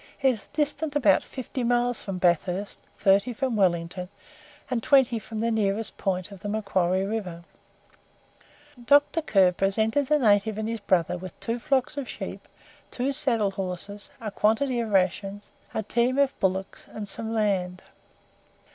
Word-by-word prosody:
It 265 -1 +5
is 215 - -9
distant 295 0 -2
about 290 - +4
fifty 260 -1 -5
miles 245 0 +1
from 195 -3 -5
Bathurst, 180 +2 0 0.2
thirty 200 +5 +3
from 255 0 -1
Wellington, 180 -2 0 0.6
and 250 -3 -1
twenty 255 -3 +4
from 215 +1 -6
the 230 0 +1
nearest 215 0 0
point 185 0 -2
of 200 - -10
the 205 +2 -5
Macquarie 190 -3 0
river. 190 -5 -4 1.4
Dr. 290 +5 +4
Kerr 195 -11 +4
presented 220 +9 +1
the 300 +2 +4
native 215 -4 +3
and 220 0 -2
his 230 0 -3
brother 180 -3 +1
with 185 -1 -9
two 230 +1 -2
flocks 270 0 0
of 275 -3 -4
sheep, - - -7 0.4
two 265 +3 -2
saddle 235 -8 +1
horses, 195 +1 -5
a 220 -3 -5
quantity 235 +5 +1
of 230 -2 -2
rations, 195 +1 0 0.2
a 220 - -2
team 240 +5 +1
of 280 -1 +3
bullocks, 190 0 -2
and 210 -1 -6
some 220 +2 -2
land. 190 -5 0
215 Hz, 155 wpm, -26 LUFS, 195-245 Hz, 1.4 s, It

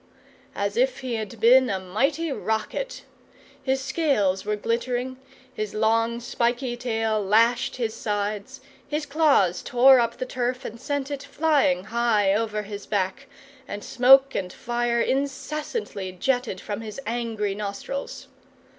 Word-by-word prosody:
as - - -2
if - - +1
he 255 -2 -3
had 220 0 -4
been 250 +3 +6
a 195 - 0
mighty 275 - -1
rocket! 220 - -3 0.6
His 265 0 0
scales 265 - +1
were 210 +1 -1
glittering, 245 +4 -2 0.4
his 215 -4 -4
long 225 +2 +2
spiky 240 +1 -1
tail 225 -3 -1
lashed 230 +5 +3
his 230 -3 -2
sides, 210 +5 -3 0.3
his 300 +1 -2
claws 275 - +3
tore 255 +2 +6
up 235 -1 0
the 255 - -3
turf 250 +1 -2
and 230 +1 -7
sent 285 -1 -2
it 280 -1 -4
flying 285 - +1
high 220 -3 +2
over 215 0 -1
his 205 0 -8
back, 205 +7 -2 0.4
and 205 0 -6
smoke 270 +2 +6
and 180 -2 -3
fire 240 +1 -1
incessantly 280 - -2
jetted 245 +1 -1
from 205 +2 -5
his 220 +2 -7
angry 225 -3 -2
nostrils. 205 +7 -5
235 Hz, 135 wpm, -25 LUFS, 210-265 Hz, 0.6 s, been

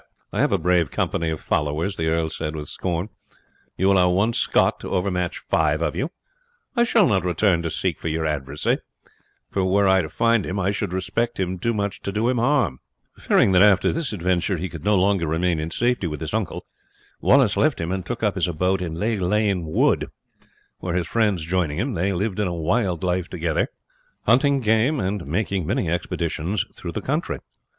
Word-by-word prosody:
"I - - -2
have - - +3
a 100 - +3
brave 90 -2 +2
company 80 -1 -1
of 80 -1 -3
followers!" 75 +6 -1
the 80 -2 -2
earl 80 0 0
said 75 -1 -4
with 75 -2 -6
scorn. 90 +2 -3 0.7
"You 95 +2 +3
allow 90 -2 +4
one 100 +6 +2
Scot - - +2
to - - -7
overmatch 90 -2 -1
five 75 0 +1
of 75 - -1
you! 140 - -1 0.7
I 235 -1 +4
shall 230 -5 +4
not 95 -6 +2
return 90 0 +2
to 85 - -2
seek 85 +1 -2
for - - -5
your 80 0 -1
adversary; 75 -1 -1 0.7
for 95 - 0
were 100 +2 +3
I 95 0 +5
to 80 - -5
find 115 -2 +2
him 95 +2 -3
I 95 +1 +1
should 100 -2 -3
respect 115 +6 -2
him 90 -1 -2
too 115 +4 0
much 100 -1 -2
to 100 - -3
do 110 +4 0
him 125 -2 +1
harm." 120 - +1 0.4
Fearing - - +3
that 90 -1 +5
after 100 -2 +5
this 165 -3 -2
adventure 90 -1 0
he 90 +3 -4
could 80 -3 -9
no 105 0 +3
longer 95 -3 +2
remain 85 +1 0
in 80 +1 -3
safety 120 +1 0
with 75 -2 -5
his - - -4
uncle, - - -2 0.5
Wallace 135 -6 +4
left 155 -3 +2
him 85 +1 -2
and 95 -1 -2
took 90 - -5
up 105 -2 +2
his 95 -2 0
abode 90 +3 0
in 85 -3 -3
Lag 105 +3 -1
Lane 100 -2 +1
Wood, 80 - +2 0.7
where 85 -2 -3
his 90 -2 0
friends 105 -8 0
joining 85 -4 0
him, 125 +7 -1
they 95 +2 0
lived 100 +2 -2
a 100 -4 0
wild 90 +2 0
life 90 -1 -1
together, 85 -2 -1 0.6
hunting 135 +4 +3
game 115 +6 +2
and 95 - -2
making 95 +1 -1
many 85 - 0
expeditions 85 +2 -2
through - - -7
the - - -3
country. - - -1
95 Hz, 200 wpm, -23 LUFS, 85-105 Hz, 0.7 s, I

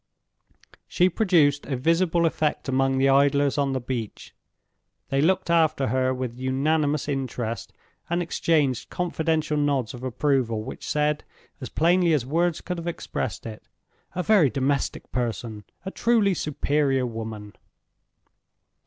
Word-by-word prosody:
She 180 0 +3
produced 165 -8 +2
a 135 - -2
visible 165 +4 +2
effect 155 -3 -1
among 135 0 +1
the 135 +1 +3
idlers 140 +1 +3
on 140 -1 +1
the 130 - 0
beach. 120 -3 -6 0.8
They 135 0 +1
looked 185 +2 +1
after 160 -6 +2
her 130 +2 +1
with 125 -2 -4
unanimous 145 +3 0
interest, 125 -5 -3 0.4
and 170 +1 0
exchanged 155 -6 0
confidential 160 -3 -1
nods 140 -5 0
of 125 - -9
approval 130 -4 0
which 130 - -7
said, 150 0 0 0.4
as 130 - -5
plainly 170 +1 +3
as 140 -6 +1
words 165 +4 0
could 180 -1 -4
have 170 - -6
expressed 130 - -4
it, 110 -2 -9 0.5
"A 180 - -1
very 195 -9 +4
domestic 140 +1 -2
person! 115 -3 -3 0.2
a 190 - -4
truly 220 -4 +2
superior 145 -4 0
woman!" 110 -3 -6
145 Hz, 135 wpm, -25 LUFS, 130-165 Hz, 0.8 s, very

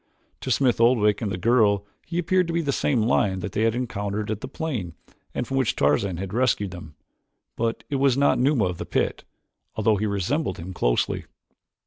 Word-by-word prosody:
To - - -5
Smith 125 -1 +2
Oldwick 110 -4 +4
and 105 -3 -2
the - - -2
girl 100 -1 +3 0.2
he 170 - -4
appeared 180 +1 +2
to 170 - -3
be 170 - +1
the 145 - 0
same 130 -4 +1
lion 105 -5 +1
that 100 - -4
they 105 - -1
had 115 0 +2
encountered 105 -3 -3
at 110 - -4
the - - -5
plane 125 - -4 0.4
and 125 - -1
from 135 - -2
which 130 -4 +1
Tarzan 85 +6 +1
had 95 +1 -5
rescued 115 -5 +1
them. 80 -4 -10 0.6
But 115 0 -2
it 140 - -1
was 135 -1 +3
not 140 0 +3
Numa 130 -4 +3
of 90 -2 -3
the - - -4
pit, - - -1 0.5
although 110 -1 +2
he 105 +2 -1
resembled 100 - -1
him 90 +3 -7
closely. - - 0
110 Hz, 200 wpm, -24 LUFS, 100-130 Hz, 0.6 s, Oldwick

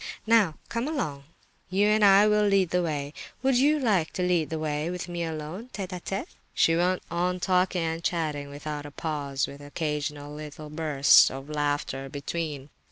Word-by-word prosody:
Now, 220 -8 +4
come 230 +3 -2
along, 150 - -3 0.4
you 195 +3 +2
and 210 0 +3
I 200 +1 +7
will 210 0 +3
lead 195 -3 +3
the 180 - +2
way. 145 -3 -3 0.3
Would 265 -1 +3
you 295 +3 +4
like 205 - +1
to 180 - -2
lead 175 -4 +1
the 160 - -3
way 155 +1 -2
with 180 0 -4
me 175 -1 -3
alone, 160 +8 -5
tête 195 -3 -4
à 180 -2 -6
tête?" 195 - -3 0.3
She 165 - +4
went 180 +2 +1
on 180 +2 0
talking 180 -1 +1
and 165 +1 -3
chatting 150 -5 -2
without 145 +1 -6
a - - -8
pause, 145 -3 -2
with 140 +1 -10
occasional 145 0 -4
little 150 0 -8
bursts 150 -3 +5
of 135 +3 -8
laughter 145 -2 -2
between. 145 0 -5
165 Hz, 180 wpm, -27 LUFS, 145-185 Hz, 0.4 s, I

